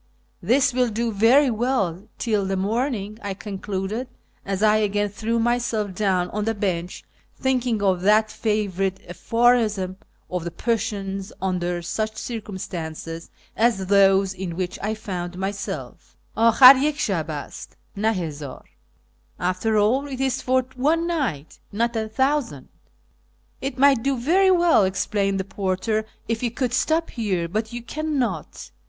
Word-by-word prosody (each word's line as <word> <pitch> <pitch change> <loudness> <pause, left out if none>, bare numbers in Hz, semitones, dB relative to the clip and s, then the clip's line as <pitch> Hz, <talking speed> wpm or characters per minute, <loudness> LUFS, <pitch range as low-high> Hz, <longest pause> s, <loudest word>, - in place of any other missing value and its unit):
"This 260 +8 +3
will 250 -1 +2
tlo 230 +1 -2
very 245 +7 +5
well 215 -6 -1
till 210 -5 0
the 195 0 -1
morning," 215 +1 -2
I 200 -1 -4
concluded, 200 +3 -4 0.4
as 195 +1 -2
I 215 0 +5
again 205 -1 0
threw 225 +3 -2
myself 230 -3 0
down 185 -2 0
on 210 0 -2
the 225 0 0
bench, 180 -3 -3 0.4
thinking 255 -3 +1
nf 190 -3 +1
that 215 +3 +4
favourite 195 -3 -1
ai)horism 215 -1 +1 0.3
of 180 -2 -3
the 170 - -3
Persians 195 -1 -2
under 175 -2 -2
such 215 +5 -3
circumstances 170 -7 -6 0.3
as 225 -4 +2
those 195 0 +4
in 185 -3 -5
which 180 0 -3
I 215 +2 -1
found 180 -5 -5
myself, 195 +2 -5
" - - -38
Akkir 255 +4 +8
yah 300 +2 +3
shab 190 - -2
ast, 150 -2 -7 0.2
na 215 +2 +1
hazdr 150 -8 -5 0.3
" 65 0 -40
(" - - -37
After 185 +5 0
all, 245 +7 +2
it 265 -2 -6
is 265 -1 0
for 255 0 +1
one 310 +6 +1
night, 260 - -3
not 235 +3 0
a 220 -1 -2
thousand 265 - -1 0.3
"). 65 0 -39
" - - -39
It 270 -1 -4
might 275 -2 +5
do 275 +1 0
very 360 +10 +3
well," 345 - +5
explained 195 +1 0
the - - -1
porter, 200 +3 -1
" - - -36
if 225 -1 -1
you 245 - 0
could 245 +1 -2
stop 320 +5 +1
here, 190 -8 -1
but 215 +5 -3
you 240 0 -6
cannot. 265 - -3
210 Hz, 155 wpm, -23 LUFS, 190-240 Hz, 0.4 s, Akkir